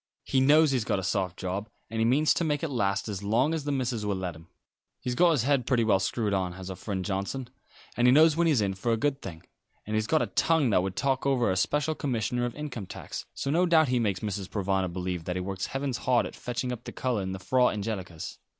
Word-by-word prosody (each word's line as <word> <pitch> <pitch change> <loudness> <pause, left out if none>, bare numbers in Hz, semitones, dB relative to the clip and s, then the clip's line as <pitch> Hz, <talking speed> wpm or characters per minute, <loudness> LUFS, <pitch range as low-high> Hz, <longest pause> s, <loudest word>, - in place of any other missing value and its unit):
He 135 - +1
knows 150 +2 +5
he's 130 -4 +1
got - - 0
a 95 - -3
soft 95 -2 -1
job, 95 +3 -4 0.2
and 115 +1 -4
he 115 - +3
means 140 +6 +4
to - - -1
make 150 -2 -1
it 165 - -1
last 100 -4 0
as 100 -3 -4
long 120 +9 +2
as 160 -3 -3
the 145 - -1
missus 125 -5 -1
will 105 -1 0
let 90 -3 -4
him. 80 +1 -14 0.5
He's 125 - -3
got 175 +8 +4
his 150 -9 +2
head 135 -3 +1
pretty 125 -3 +3
well 105 -4 +3
screwed 105 +2 -1
on, 95 -2 0
has 95 +1 -7
our - - -5
friend 95 -1 -4
Johnson; 105 +6 -3 0.4
and 120 +1 +3
he - - +7
knows 155 +3 +6
when 170 +1 +2
he's 145 -8 +3
in 100 -1 0
for 95 +5 -2
a 115 - +2
good 140 +2 0
thing. 80 -4 -8 0.4
And 105 - -3
he's 110 0 0
got 155 - +3
a - - -6
tongue 160 -7 +3
that 90 - +4
would 95 0 -3
talk 135 0 0
over 125 -6 +2
a - - 0
special 150 +11 +1
commissioner 120 -4 -1
of 120 - -4
income 140 -10 -6
tax; - - -7
so 140 - -2
no 175 +4 +3
doubt 160 -4 +4
he 125 -1 +2
makes 100 -5 0
Mrs. 100 -3 -4
Provana 95 -2 -1
believe 90 -1 -4
that 90 - -2
he - - -1
works 95 +1 -3
heavens 135 -2 -2
hard 125 -2 +2
at - - -7
fetching 125 +1 -3
up 120 -1 -6
the - - -6
colour 125 -5 -1
in 95 0 -3
the - - -4
Frau 125 +6 +3
Angelicas." 100 -6 -5
115 Hz, 260 wpm, -28 LUFS, 95-135 Hz, 0.5 s, he